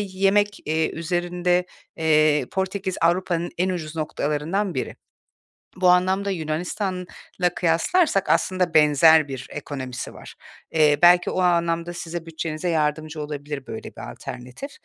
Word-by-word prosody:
yemek, 200 +1 +1
eee, 160 +1 0
üzerinde, 175 +1 -1 0.3
eee, 155 -4 +3
Portekiz 190 0 -2
Avrupa’nın 175 0 +1
en 185 +1 +1
ucuz 165 -3 -4
noktalarından 155 +5 -2
biri. 130 - -4 0.8
Bu 185 -1 +3
anlamda 190 +2 +3
Yunanistan'la 180 +2 -3
kıyaslarsak 195 - +2
aslında 185 -2 +1
benzer 155 0 +6
bir 130 -2 -6
ekonomisi 130 -4 -6
var. - - -12 0.4
Eee, 150 -2 +4
belki 175 +1 +6
o 185 - -1
anlamda 170 -1 +1
size 170 -1 -6
bütçenize 160 +1 -4
yardımcı 155 -1 -1
olabilir 145 -2 -6
böyle - - -7
bir - - -7
alternatif. 125 - -8
170 Hz, 120 wpm, -23 LUFS, 155-185 Hz, 0.8 s, benzer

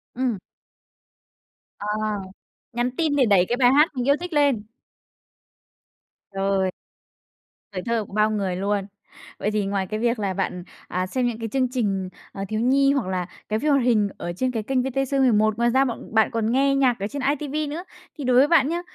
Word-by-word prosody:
Ừm. 245 -6 -1 1.4
Ờ, 205 - -5 0.9
nhắn 240 +1 0
tin 315 -4 +1
để 265 -3 +4
đẩy 195 -4 +4
cái 240 - +1
bài 250 -1 +5
hát 300 +3 +5
mình 250 +1 -2
yêu 280 - +5
thích 355 -1 -6
lên. 280 -8 +2 1.7
Trời! 195 -1 0 1.0
Tuổi 185 - -4
thơ 230 -3 0
của - - -15
bao 215 0 +2
người 195 -4 -1
luôn. 200 +1 -1 0.5
Vậy 210 - -1
thì 210 -2 0
ngoài 195 -1 -1
cái 215 +3 -3
việc 235 -1 +1
là 195 -2 -1
bạn, 180 0 -3 0.2
à, 185 +1 -2
xem 250 +3 0
những 230 -1 -3
cái 225 -1 -4
chương 260 0 +1
trình, 195 -7 -1 0.2
à, 195 - -5
thiếu 215 0 -1
nhi 275 +3 +4
hoặc 265 -9 -1
là 185 -1 -2 0.2
cái 215 +1 0
phim 300 +1 +1
hoạt 275 -3 +3
hình 215 -5 +3
ở 175 - -4
trên 255 +7 -1
cái 225 -3 -3
kênh 260 +2 0
VTC11, 260 -4 +2
ngoài 235 0 +2
ra 265 +2 +3
bọn 235 -2 -6
bạn 220 -1 +3
còn 225 0 0
nghe 275 +2 +3
nhạc 255 -5 +2
ở 200 - -2
trên 280 +3 -5 0.2
iTV 300 0 -3
nữa. 340 +4 -5 0.3
Thì 290 - -5
đối 250 -1 +2
với 275 - +6
bạn 295 -4 +4
nhá, 345 +1 -1
235 Hz, 200 wpm, -23 LUFS, 205-270 Hz, 1.7 s, với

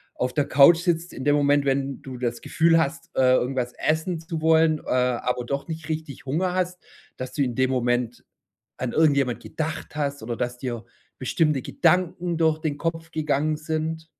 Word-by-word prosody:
auf 125 0 -2
der 145 - +2
Couch 145 +5 +7
sitzt 175 -1 -1
in 130 - -7
dem 145 - +4
Moment, 145 0 +3
wenn 135 -1 -1
du 130 -2 -8
das 120 -1 -3
Gefühl 165 0 +3
hast, 160 0 -1
äh, 130 -1 +5
irgendwas 125 -1 -1
essen 160 +2 0
zu 165 0 -5
wollen, 160 -1 +4
äh, - - -11
aber 125 -1 0
doch 140 +5 -3
nicht 160 -1 -6
richtig 155 -4 -5
Hunger 180 +7 0
hast, 180 -1 -2 0.3
dass 130 0 -5
du 145 - -1
in 125 -4 0
dem 130 +1 +2
Moment 120 -1 -1 0.5
an 125 -2 -3
irgendjemand 140 -6 +2
gedacht 155 -1 -5
hast 140 -1 -2
oder 120 +1 -3
dass 125 0 -3
dir 120 -3 -4 0.4
bestimmte 150 +1 +1
Gedanken 175 +2 +1
durch 160 -1 +2
den 155 -3 -2
Kopf 165 +1 -3
gegangen 155 -1 0
sind? 160 +1 -3
145 Hz, 180 wpm, -24 LUFS, 130-160 Hz, 0.5 s, Couch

